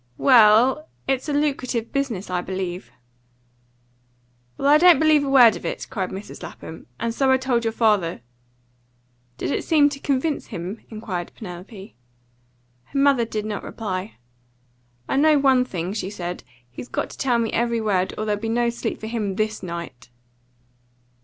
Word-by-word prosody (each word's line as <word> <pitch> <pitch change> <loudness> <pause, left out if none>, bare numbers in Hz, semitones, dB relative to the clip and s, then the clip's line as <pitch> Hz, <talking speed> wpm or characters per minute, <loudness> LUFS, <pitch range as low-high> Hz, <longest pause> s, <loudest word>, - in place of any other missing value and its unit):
"Well, 250 +4 +5 0.2
it's 270 +2 -1
a - - -1
lucrative 270 -5 -1
business, 235 -10 -2
I 180 -1 0
believe." 185 0 -5 1.7
"Well, 275 - 0
I 295 +1 +6
don't 355 -1 +7
believe 310 -2 +4
a 280 - -2
word 245 -6 +7
of 170 - -9
it!" - - -4
cried 190 -3 -2
Mrs. 195 +2 -8
Lapham. 160 - -10
"And 230 0 -2
so 270 +2 +1
I 260 - +5
told 255 -2 0
your 225 - 0
father." 210 - +1 1.2
"Did - - -3
it - - -1
seem 300 -3 +4
to 280 -1 -7
convince 280 +2 -1
him?" 180 +6 -6
inquired 200 -6 -5
Penelope. 195 +1 -10 0.9
Her 275 - -7
mother 275 -4 +4
did 215 -2 -4
not 210 -2 -4
reply. 195 -2 -5 0.9
"I - - 0
know 305 +1 +5
one 265 -2 +4
thing," 180 -4 -4
she 200 -3 -3
said. 180 -3 -6 0.3
"He's 125 - -9
got - - -3
to - - -12
tell 250 -3 +2
me 230 -1 -1
every 235 0 +1
word, 195 -4 0
or 215 - -2
there'll 210 -1 -1
be 225 - -3
no 235 +1 +1
sleep 235 - -4
for - - -7
him 220 -4 -3
THIS 215 +1 -2
night." 170 -9 -7
225 Hz, 165 wpm, -23 LUFS, 190-270 Hz, 1.7 s, don't